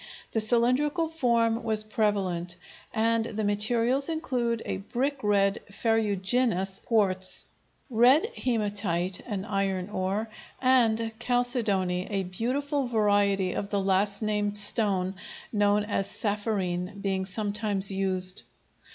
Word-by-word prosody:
the 225 - 0
cylindrical 255 +9 +1
form 235 -7 +1
was 220 -2 +2
prevalent, 195 -5 -1 0.4
and 230 0 +1
the 220 -1 -4
materials 230 +7 +1
include 245 -8 -2
a - - -3
brick 260 +8 -2
red 200 -2 +2
ferruginous 205 -2 0
quartz, 190 -5 +2 0.4
red 255 - +4
hematite 200 -6 -1
(an 200 -4 -4
iron 195 -3 -1
ore), 195 +3 -2 0.3
and 230 -3 +2
chalcedony, 225 -8 0
a 195 -2 -1
beautiful 260 +9 -2
variety 205 -4 +2
of 200 - -4
the 205 - 0
last 195 +2 +1
named 210 -1 0
stone 200 -3 +3 0.4
known 205 0 +2
as 205 -2 -1
sapphirine 200 -3 -2
being 195 -1 -1
sometimes 205 0 -1
used. 185 -1 +1
210 Hz, 110 wpm, -27 LUFS, 195-235 Hz, 0.4 s, red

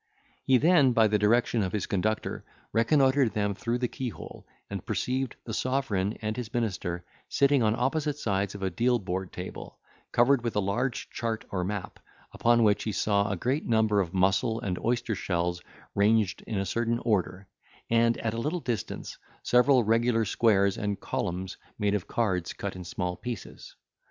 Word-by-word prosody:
He 130 - +5
then, 145 -3 +5
by 110 -2 +5
the 105 0 +2
direction 115 +2 +3
of 95 -2 -2
his 105 - -1
conductor, 110 +3 -1 0.3
reconnoitred 130 +1 +3
them 105 -1 0
through 115 +5 -2
the 125 0 0
keyhole, 125 -2 -7 0.2
and - - -5
perceived 130 0 -2
the 110 - -5
sovereign 110 -6 -1
and 110 0 -1
his 120 -3 -5
minister 90 -6 -2 0.2
sitting 140 -1 +3
on 110 -1 +2
opposite 145 +3 0
sides 100 -6 -1
of 100 - -6
a 95 - 0
deal 120 +1 +2
board 95 -3 -4
table, 90 +1 -8 0.3
covered 120 +1 +4
with 115 - -2
a - - +3
large 115 +6 -2
chart 115 -2 -3
or 90 -2 -1
map, 100 0 -4 0.3
upon 120 0 +3
which 105 -1 +3
he 110 - -1
saw 100 +1 +1
a - - -1
great 135 +5 -1
number 110 -3 +3
of 85 -3 -3
mussel 95 +5 +2
and 90 -3 -2
oyster 120 -1 0
shells 85 -3 -1 0.3
ranged 105 -1 +2
in 110 - -2
a 95 - 0
certain 115 +5 0
order, 100 -3 0 0.4
and, 115 0 +3
at 115 -1 -2
a 115 - -2
little 155 +7 -1
distance, 120 - -4 0.2
several 125 +1 +4
regular 115 +1 +2
squares 100 -2 +2
and 100 -1 -2
columns 90 +1 -3 0.2
made 105 -1 +1
of 105 -4 -2
cards 95 -7 -1
cut 100 -2 -5
in 90 - -7
small 90 +1 -3
pieces. 120 +2 -8
110 Hz, 175 wpm, -28 LUFS, 100-120 Hz, 0.4 s, He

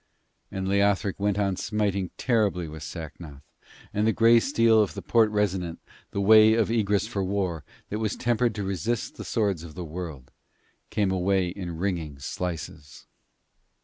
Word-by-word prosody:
And 95 -1 -4
Leothric 100 0 +1
went 100 0 +1
on 100 -2 +1
smiting 100 -3 -1
terribly 105 -8 +1
with 80 0 -9
Sacnoth, 75 -3 -8 0.5
and 105 +2 +1
the - - +4
grey 115 +1 +5
steel 115 -3 +4
of 105 - -1
the - - -5
Porte 115 -2 +4
Resonant, 95 -5 -1 0.3
the - - -4
Way 110 +2 +7
of 115 -1 +1
Egress 105 -3 +1
for 105 -4 -3
War, 95 -4 -2 0.3
that 105 - -2
was 110 -2 -1
tempered 120 -1 +1
to 105 - -3
resist 100 +5 -2
the - - -6
swords 100 -7 0
of 80 -2 -10
the 90 -1 -5
world, 80 -5 -7 0.6
came 100 -3 0
away 95 0 +1
in 85 -2 -6
ringing 85 -6 -3
slices. 75 -1 -6
100 Hz, 160 wpm, -26 LUFS, 90-110 Hz, 0.6 s, Way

